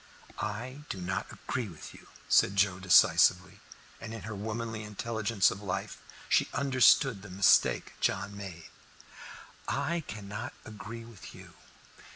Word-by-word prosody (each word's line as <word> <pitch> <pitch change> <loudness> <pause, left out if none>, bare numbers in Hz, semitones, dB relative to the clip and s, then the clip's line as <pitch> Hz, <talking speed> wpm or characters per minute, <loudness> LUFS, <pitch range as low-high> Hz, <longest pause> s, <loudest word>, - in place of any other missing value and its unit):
"I 120 +7 -5
do 95 - -4
not 90 +1 -3
agree 125 -3 -4
with 80 -4 -11
you," - - -16 0.2
said 100 - +4
Joe 95 -1 +2
decisively, 90 +1 +4 0.4
and 115 0 -7
in 115 - -8
her 110 - -6
womanly 110 +2 -4
intelligence 105 -1 0
of 100 - -7
life 95 -3 -4 0.3
she - - +2
understood 135 -4 +4
the 100 - -11
mistake 95 +2 +3
John 100 +1 -1
made. 90 -5 -9 1.0
"I 170 0 -1
cannot 105 +2 -6
agree 115 +1 -9
with 115 -4 -12
you. - - -13
105 Hz, 135 wpm, -30 LUFS, 95-115 Hz, 1.0 s, said